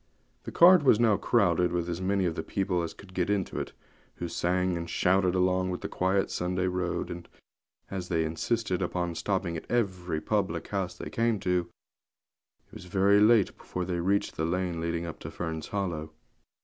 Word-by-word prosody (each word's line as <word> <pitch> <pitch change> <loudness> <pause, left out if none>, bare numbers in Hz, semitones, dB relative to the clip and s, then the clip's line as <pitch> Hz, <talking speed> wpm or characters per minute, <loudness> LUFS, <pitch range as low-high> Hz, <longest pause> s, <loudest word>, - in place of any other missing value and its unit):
The - - -5
cart 180 0 +7
was 120 -5 +5
now 115 -3 +4
crowded 90 -7 +2
with 85 -1 -1
as 85 +1 -3
many 95 0 +1
of 85 - 0
the 80 - -3
people 95 +1 -1
as 85 - -3
could 95 -2 -14
get 90 0 0
into 100 -2 -1
it, - - -4 0.4
who 85 - -4
sang 90 +1 0
and 85 0 -4
shouted 95 +1 +2
along 90 0 +1
the - - -5
quiet 95 +1 0
Sunday 90 +1 -1
road; 90 -1 -2
and, 85 0 -8 0.6
as 95 -2 -4
they 80 -3 +1
insisted 95 +4 -1
upon 90 -1 -1
stopping 90 0 -1
at 80 - -7
every 95 -8 -1
public 90 -1 -1
house 95 -3 -2
they - - -7
came 115 -2 +1
to, 90 -1 0 1.0
it - - -31
was - - -10
very 100 +3 +4
late 105 -1 +4
before 90 0 -5
they 90 -1 -2
reached 100 +4 0
the 80 - 0
lane 90 -1 -1
leading 85 0 -2
up 85 - -7
to - - -7
Fern's 80 -2 -5
Hollow. 85 -6 -3
90 Hz, 190 wpm, -28 LUFS, 85-100 Hz, 1.0 s, cart